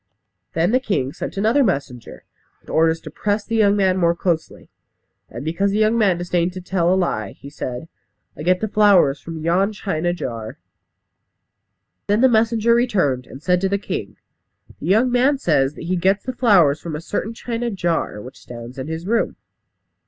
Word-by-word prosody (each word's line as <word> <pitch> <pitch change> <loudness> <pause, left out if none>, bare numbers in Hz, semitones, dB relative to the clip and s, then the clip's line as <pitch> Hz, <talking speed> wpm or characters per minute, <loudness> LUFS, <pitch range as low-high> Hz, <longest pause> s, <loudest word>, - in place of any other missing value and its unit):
Then 165 +4 +1
the 255 - +3
king 170 - -2
sent - - -6
another 225 +8 +3
messenger, 140 - -3 0.4
with - - -13
orders 160 0 +2
to - - -9
press 205 0 -1
the 230 - -3
young 205 -2 +4
man 190 -2 +2
more 170 -1 +3
closely; 170 -2 -2 0.6
and 120 +5 -8
because 170 +5 0
the 200 - -1
young 215 +1 +3
man 200 -6 +3
disdained 175 0 -1
to 185 - -6
tell 180 -1 0
a - - +4
lie, 110 - -1
he 140 - -12
said, 125 +1 -6 0.5
"I - - -9
get 180 +3 +2
the 220 - 0
flowers 200 -9 +4
from 165 -2 -8
yon 190 +5 +1
china 175 -5 -2
jar." 115 -10 -5 1.5
Then 205 +3 +2
the 260 - +6
messenger 230 0 +3
returned, 185 - +1
and 135 +3 -12
said 180 +1 +2
to 195 - +1
the 200 - +1
king, 200 - -5 0.6
"The - - -6
young 225 +6 +3
man 260 +4 +3
says 150 - +1
that - - -9
he 180 +2 -1
gets 190 +3 +1
the 255 - -3
flowers 180 - +4
from 165 -3 -5
a - - -4
certain 210 +5 -4
china 235 +1 -3
jar 175 - -2
which 125 +5 -11
stands 120 +2 -9
in 130 - -5
his 160 +2 -5
room." 230 +3 0
180 Hz, 190 wpm, -21 LUFS, 160-215 Hz, 1.5 s, the